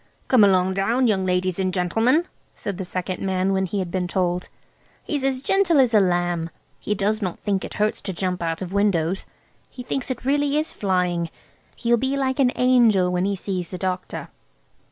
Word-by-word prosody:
"Come 250 -5 +6
along 190 -1 +4
down, 230 +7 +1
young 195 -5 +1
ladies 180 0 0
and 185 -1 +1
gentlemen," 225 - +2 0.3
said 200 -2 -5
the 190 - -3
second 185 +1 -4
man 190 0 0
when 190 0 0
he 200 - -3
had 185 -3 -2
been 180 -1 -1
told. 180 0 -1 0.5
"He's 290 -3 -2
as 265 -1 -1
gentle 355 -3 +3
as 250 -3 +4
a 215 - +7
lamb. 175 -3 0 0.3
He 210 - -2
does 210 +3 0
not 185 -4 -2
think 200 -2 -1
it - - -7
hurts 210 +1 0
to 195 - -4
jump 180 0 -2
out 165 +1 -2
of 185 +1 -7
windows. 190 -3 +1 0.4
He 250 - -9
thinks 265 +1 -3
it 250 -1 -4
really 290 +1 +2
is 310 +1 -1
flying. 180 -4 0 0.5
He'll 235 0 +2
be 265 +3 -1
like 265 0 -1
an 255 -2 +4
angel 230 -8 +4
when 180 +1 0
he 200 0 0
sees 185 -2 -4
the 185 - -5
doctor." 185 0 -4
195 Hz, 195 wpm, -23 LUFS, 180-245 Hz, 0.5 s, a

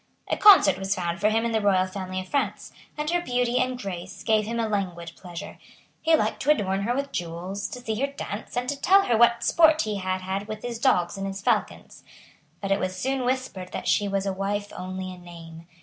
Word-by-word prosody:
A - - +3
consort 385 - +7
was 195 +1 -1
found 175 -1 -3
for 210 - +4
him 225 +1 +1
in 235 - 0
the 220 -1 +1
royal 190 -2 +3
family 185 0 -5
of 185 - -7
France; 210 -4 -2 0.3
and 300 0 -3
her 350 0 +1
beauty 245 -3 0
and 255 0 0
grace 185 -2 -7
gave 215 -1 +2
him 235 +1 -2
a 225 - 0
languid 180 -5 -3
pleasure. 180 0 -9 0.4
He 325 0 +4
liked - - -1
to 275 - -1
adorn 195 -9 +2
her 235 +5 0
with 280 +1 -3
jewels, 175 +4 -4
to 250 - -8
see 220 -3 -3
her 275 - +1
dance, 240 -6 -7
and 245 0 -1
to 280 +1 -3
tell 390 +4 +6
her 240 - +1
what 235 +1 +4
sport 315 +4 +5
he 215 -2 -2
had 185 -1 -2
had 190 +2 -3
with 215 0 -6
his 240 -2 -4
dogs 190 -9 +2
and 195 - -3
his 195 0 -6
falcons. - - -1 0.6
But 195 -1 -3
it 195 - +3
was 185 0 -2
soon 265 +4 -1
whispered 250 -8 -3
that - - -4
she 205 - +2
was 195 0 -1
a 195 - -1
wife 205 +2 -3
only 185 0 -5
in 180 -1 -13
name. 165 -1 -12
205 Hz, 230 wpm, -25 LUFS, 185-245 Hz, 0.6 s, consort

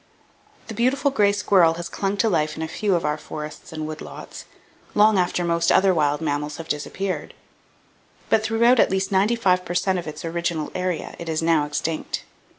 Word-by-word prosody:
The - - -6
beautiful 260 +4 +1
gray 205 -6 +3
squirrel 185 -5 +3
has 170 0 -5
clung 195 0 -2
to 225 - +2
life 155 -6 +1
in 160 - -3
a - - -3
few 195 +4 0
of 170 - -1
our 150 +1 -1
forests 150 0 -8
and 155 -1 -4
wood 155 0 -6
lots, - - -9 0.5
long 210 -1 +5
after 180 0 0
most 170 0 +2
other 190 0 +5
wild 150 -2 +1
mammals 150 -1 -2
have 165 - -8
disappeared; 185 +6 -3 0.9
but 220 - +3
throughout 230 +3 +3
at - - +5
least 190 +1 -1
ninety 200 +4 +3
five 185 -5 +2
per 175 0 -5
cent, 185 0 +1
of 170 - -7
its 155 - -7
original 165 -2 -2
area, 180 -2 -3
it 170 - -6
is 160 0 -1
now 160 -3 +3
extinct. 155 +2 -3
175 Hz, 195 wpm, -23 LUFS, 155-200 Hz, 0.9 s, long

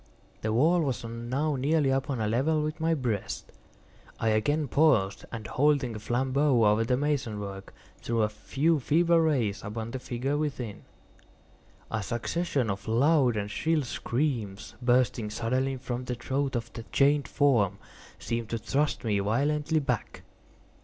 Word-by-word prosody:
The 110 - -1
wall 160 +10 +4
was 135 -6 -2
now 120 +6 -2
nearly 140 +1 +2
upon 135 -1 -1
a 110 - 0
level 145 +8 +1
with 155 +1 -3
my 165 +1 +2
breast. 120 -8 -3 0.7
I 115 - +1
again 145 +8 +1
paused, 130 -9 +2
and 110 -2 -6
holding 140 0 +2
the 110 - -6
flambeaux 130 +3 +2
over 105 +2 +4
the 125 +2 +1
mason 135 -7 -1
work, 100 -1 -7 0.3
threw 115 -1 0
a - - +3
few 140 +9 0
feeble 165 +5 +3
rays 130 -11 +1
upon 110 +2 -5
the 130 - -4
figure 130 +4 -2
within. 130 -8 -4 1.1
A 110 - -1
succession 120 - -1
of 95 - -6
loud 130 +1 +3
and 105 0 -3
shrill 160 +5 +1
screams, 120 -5 -2
bursting 120 -3 +2
suddenly 130 +4 -1
from 125 -1 -4
the 125 - -3
throat 135 +3 -2
of 115 -1 -3
the 115 - -6
chained 145 +1 +3
form, 115 -9 +2 0.4
seemed 115 -1 -3
to 115 - -1
thrust 140 +6 -1
me 105 -3 +1
violently 145 +9 +1
back. 125 -5 -3
125 Hz, 155 wpm, -28 LUFS, 115-145 Hz, 1.1 s, wall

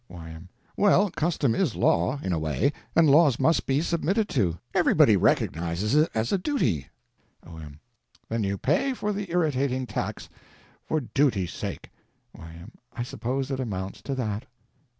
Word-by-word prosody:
Y.M. 80 0 -10 0.3
Well, 200 -1 +3
custom 155 -7 0
is - - 0
law, 90 +12 +1
in 95 - -1
a 80 - 0
way, 80 - 0 0.2
and 165 -1 +5
laws 145 -3 +5
must 160 +5 +2
be 135 +2 +2
submitted 190 +6 0
to—everybody 90 - +2
recognizes 85 +7 0
it 155 +2 +4
as 110 +2 0
a 195 - +2
duty. 130 - -1 0.6
O.M. 80 -3 -11 0.5
Then 115 -1 -2
you 100 0 -1
pay 260 - +1
for 210 -3 -2
the 200 -2 -5
irritating 140 -6 0
tax - - -4 0.6
for 155 - -1
duty's 120 -8 0
sake? - - -6 0.4
Y.M. 85 +2 -11 0.2
I 120 0 -4
suppose 130 +3 -3
it 135 - -2
amounts 95 -6 -4
to 135 - -4
that. 110 -4 -3
130 Hz, 150 wpm, -26 LUFS, 95-155 Hz, 0.6 s, and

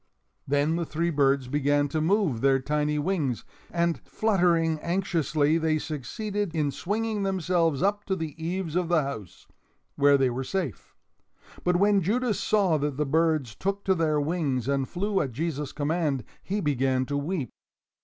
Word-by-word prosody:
Then 145 +4 +2
the 170 - -1
three 170 +2 -1
birds 140 -3 +2
began 145 +1 +2
to 155 +2 -1
move 165 - +1
their 135 -1 +4
tiny 150 +2 0
wings, 150 - -1 0.2
and, 170 -1 0
fluttering 175 -7 +2
anxiously, 160 -3 +1
they 160 -1 +1
succeeded 170 - -4
in 150 -3 +1
swinging 215 +6 -2
themselves 180 -5 +1
up 205 +1 +1
to 190 - 0
the 160 -4 -4
eaves 170 -1 -3
of 180 -2 0
the 170 -3 +3
house, 125 -10 -7 0.5
where 140 0 +5
they 135 -2 +2
were 130 +2 -3
safe. 170 - -4 0.7
But 180 0 +2
when 200 +1 +4
Judas 220 +5 0
saw 190 -7 +2
that 145 -1 -2
the 150 - +1
birds 155 -5 +1
took 195 - -3
to 190 - +4
their 160 -4 +1
wings 145 -5 -1
and 140 -1 0
flew 195 +2 0
at 130 -4 -3
Jesus' 150 0 -3
command, 150 -3 -1 0.2
he 205 +2 -2
began 130 -4 +1
to 145 - -3
weep. 145 - -2
160 Hz, 165 wpm, -27 LUFS, 140-185 Hz, 0.7 s, where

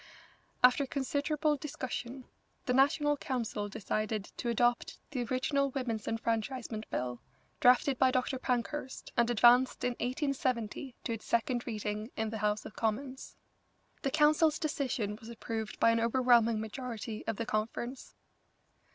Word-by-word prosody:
After 255 +3 +6
considerable 290 +2 0
discussion, 260 -3 -5 0.4
the 250 - +1
National 290 +3 +4
Council 225 -6 -3
decided 215 0 -2
to 240 - -2
adopt 240 +1 +1
the 255 -4 -1
original 275 +3 +1
Women's 245 -5 -3
Enfranchisement 225 0 -2
Bill, 125 -1 -3 0.4
drafted 250 +2 +4
by 260 - +6
Dr. 255 +1 0
Pankhurst, 260 +2 -3
and 235 -1 +3
advanced 240 +2 +5
in 250 - +2
1870 255 -1 -2
to 230 - -2
its 225 - -7
second 240 +1 0
reading 210 -1 -3
in 220 -1 -1
the 220 - -4
House 210 +1 0
of - - -9
Commons. 260 +4 -3 0.6
The 275 - 0
Council's 305 +2 +4
decision 255 -9 -2
was 225 - -11
approved 225 -1 -5
by 230 - +5
an 230 - +2
overwhelming 235 -1 +4
majority 220 -1 -5
of 225 - 0
the 230 - -2
conference. 230 +4 -3
245 Hz, 135 wpm, -32 LUFS, 220-265 Hz, 0.6 s, After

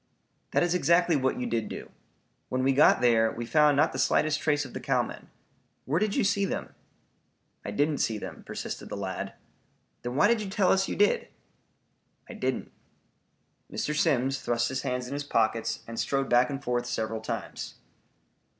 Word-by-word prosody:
"That - - +2
is 175 0 +1
exactly 170 0 +3
what 130 -2 0
you 125 - -2
did 115 -2 -1
do. - - -8 0.6
When 130 0 0
we 135 +1 +3
got 140 - +5
there 115 -2 +4
we 120 - -5
found 150 +2 +4
not 155 +3 +4
the 130 - -4
slightest 150 +3 +2
trace 145 -1 +1
of 130 - -11
the - - -4
cowmen. - - -2 0.6
Where 150 +5 +1
did 215 0 0
you 270 - +2
see 200 0 +2
them?" 195 - -3 0.9
"I - - -5
didn't 145 0 0
see 110 - 0
them," - - -8
persisted - - -6
the - - -5
lad. 95 -2 -4 0.7
"Then 120 +1 -4
why 150 - +5
did 230 0 +2
you 205 - -4
tell 195 -1 +2
us 190 0 +2
you - - -3
did?" 205 0 +2 1.0
"I - - -9
didn't." - - -2 1.0
Mr. 150 - -2
Simms 135 -2 +2
thrust 115 0 0
his 130 0 -2
hands 125 0 -2
in 130 - -6
his 145 +1 -3
pockets 115 -3 0
and 115 0 -6
strode 135 -1 0
back 120 +1 +5
and 140 -1 -5
forth 120 -1 -1
several 110 -1 -2
times. 110 - -5
135 Hz, 185 wpm, -28 LUFS, 120-155 Hz, 1.0 s, got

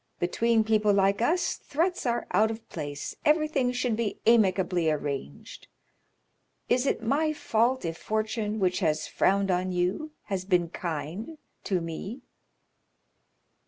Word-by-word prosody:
Between 225 +6 +2
people 215 -1 +3
like 200 +1 +3
us 335 +9 +2
threats 335 0 -1
are 240 0 0
out 220 +1 +4
of 225 0 -7
place, 145 -3 -5
everything 300 -4 +2
should 245 -2 0
be 225 -2 -2
amicably 190 -6 +3
arranged. 140 - -4 1.0
Is 250 +2 +2
it 230 - 0
my 300 +6 +1
fault 240 - +1
if 165 0 -3
fortune, 220 0 -2
which 185 -2 +1
has 155 -4 0
frowned 195 0 +2
on 185 +1 0
you, 185 - -1
has 195 -3 -3
been 180 -3 +1
kind 175 - -5 0.3
to 185 -3 0
me?" 195 +10 -6
210 Hz, 130 wpm, -27 LUFS, 180-240 Hz, 1.0 s, out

